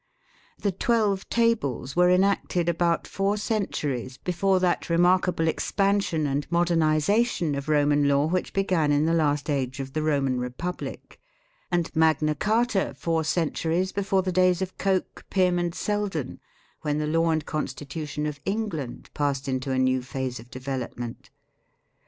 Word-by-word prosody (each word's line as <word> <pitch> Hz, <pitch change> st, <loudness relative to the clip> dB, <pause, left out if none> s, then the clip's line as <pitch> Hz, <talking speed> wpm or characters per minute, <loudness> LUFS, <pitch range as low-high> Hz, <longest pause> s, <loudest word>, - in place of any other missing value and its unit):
The 200 Hz, -, 0 dB
Twelve 210 Hz, -1 st, 0 dB
Tables 145 Hz, -, 0 dB
were 180 Hz, 0 st, +5 dB
enacted 180 Hz, -2 st, +2 dB
about 170 Hz, 0 st, +1 dB
four 200 Hz, +1 st, -1 dB
cen 210 Hz, -1 st, -1 dB
turies 130 Hz, -2 st, -3 dB
before 185 Hz, +2 st, +1 dB
that 180 Hz, -1 st, 0 dB
remarkable 175 Hz, 0 st, +3 dB
expansion 195 Hz, -2 st, +1 dB
and 145 Hz, +2 st, -2 dB
modern 170 Hz, 0 st, +2 dB
ization 160 Hz, +2 st, +2 dB
of 140 Hz, +2 st, -5 dB
Roman 145 Hz, -1 st, +3 dB
law 140 Hz, +1 st, +3 dB
which 180 Hz, +3 st, -1 dB
began 180 Hz, -6 st, +1 dB
in 145 Hz, +1 st, +3 dB
the 165 Hz, -, +2 dB
last 150 Hz, -3 st, +1 dB
age 135 Hz, -3 st, -1 dB
of 135 Hz, 0 st, -5 dB
the 155 Hz, -, -1 dB
Roman 140 Hz, -4 st, +1 dB
Republic, 125 Hz, +9 st, -6 dB, 0.5 s
and 175 Hz, -2 st, -1 dB
Magna 155 Hz, -1 st, +3 dB
Carta 215 Hz, -, 0 dB
four 165 Hz, -1 st, 0 dB
centuries 165 Hz, +3 st, 0 dB
before 195 Hz, -1 st, 0 dB
the 185 Hz, -, -1 dB
days 180 Hz, 0 st, +3 dB
of 190 Hz, -1 st, -4 dB
Coke, 190 Hz, -2 st, -1 dB
Pym, 180 Hz, -2 st, +2 dB
and 175 Hz, 0 st, -2 dB
Selden, 205 Hz, -9 st, -2 dB, 0.4 s
when 150 Hz, 0 st, -1 dB
the 150 Hz, -, -1 dB
law 165 Hz, +2 st, +2 dB
and 160 Hz, -2 st, 0 dB
constitution 150 Hz, 0 st, -4 dB
of 150 Hz, -1 st, -4 dB
England 195 Hz, -, -4 dB
passed 140 Hz, -2 st, -1 dB
into 130 Hz, 0 st, -2 dB
a 130 Hz, -, 0 dB
new 130 Hz, 0 st, +2 dB
phase 130 Hz, 0 st, -4 dB
of 120 Hz, +2 st, -13 dB
development. 130 Hz, -2 st, -5 dB
165 Hz, 150 wpm, -26 LUFS, 145-185 Hz, 0.5 s, were